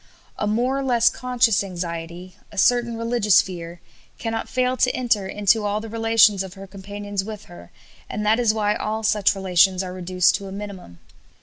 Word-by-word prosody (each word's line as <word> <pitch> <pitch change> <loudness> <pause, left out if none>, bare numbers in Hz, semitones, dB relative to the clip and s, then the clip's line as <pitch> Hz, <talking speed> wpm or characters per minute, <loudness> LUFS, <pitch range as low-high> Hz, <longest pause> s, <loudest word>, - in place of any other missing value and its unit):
"A 210 - -1
more 245 +6 0
or - - -3
less 240 -3 +3
conscious 245 -4 +1
anxiety, 175 -1 -6 0.2
a 205 - -13
certain 235 +2 +2
religious 230 -3 +3
fear, 170 -2 -5 0.4
cannot 225 -1 -4
fail 255 0 0
to 250 - +3
enter 230 -6 0
into 210 +2 +1
all 205 +1 -1
the 225 +1 -8
relations 225 -3 +3
of 190 0 -7
her 195 0 -10
companions 200 +1 -6
with 215 0 -8
her, 85 0 -14 0.4
and 210 +1 -4
that 220 +3 +3
is 235 -3 +3
why 210 -1 0
all 220 +1 -3
such 215 -2 +2
relations 190 0 +2
are 180 -1 -6
reduced 180 0 +1
to 200 - -9
a - - -8
minimum. 195 - -8
205 Hz, 185 wpm, -22 LUFS, 190-225 Hz, 0.4 s, less